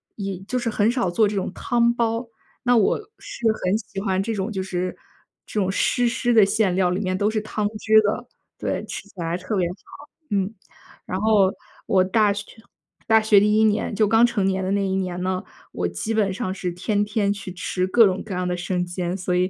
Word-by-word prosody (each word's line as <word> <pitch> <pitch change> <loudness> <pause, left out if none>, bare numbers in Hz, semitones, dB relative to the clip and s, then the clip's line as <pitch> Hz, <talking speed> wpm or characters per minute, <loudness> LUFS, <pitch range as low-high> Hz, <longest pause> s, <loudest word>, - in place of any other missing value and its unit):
也 195 -3 -4
就 205 +7 -4
是 235 -1 -1
很 215 +1 +2
少 240 -7 0
做 210 +5 +3
这 205 - -3
种 195 - -2
汤 235 0 +1
包， 230 0 -1 0.4
那 245 -1 +4
我 220 -4 +3 0.2
是 235 - -8 0.2
很 185 +3 +2
喜 195 -3 -7
欢 190 -2 0
这 225 +3 -2
种 200 +2 -2
就 190 -3 -2
是 185 -1 -3 0.5
这 210 - -2
种 190 0 0
湿 245 +4 +1
湿 240 0 0
的 220 -3 +7
馅 200 -2 +1
料 185 -1 +2
里 180 +2 -1
面 185 -2 -1
都 205 +2 +1
是 215 0 0
汤 215 -1 -2
汁 220 0 +5
的。 215 +4 -2 0.3
对， - - -2
吃 - - -6
起 - - -21
来 170 0 -2
特 185 +4 -4
别 185 -3 +2
好， 180 - -6 0.5
嗯。 200 +1 0 0.5
然 185 - -3
后 210 -3 +4 0.3
我 185 -1 +3
大 205 +2 +3
学 205 0 -6 0.6
大 220 -1 +5
学 215 -2 +5
第 210 +1 +3
一 220 - +4
年， 215 0 +1
就 215 - +3
刚 225 +2 +5
成 210 -5 0
年 190 0 0
的 185 - -2
那 200 0 +1
一 190 0 -1
年 180 -1 -3
呢， 185 0 -1 0.3
我 90 -1 -2
基 90 - -3
本 205 -4 +1
上 190 -3 -3
是 185 -2 -3
天 205 +3 0
天 205 -1 0
去 200 -2 -5
吃 185 0 -2
各 230 +4 +6
种 190 -1 0
各 205 - -6
样 180 0 -1
的 180 - -1
生 180 0 -1
煎。 175 0 -3
所 180 -1 -2
以 180 +1 +2
200 Hz, 245 characters per minute, -23 LUFS, 185-220 Hz, 0.6 s, 的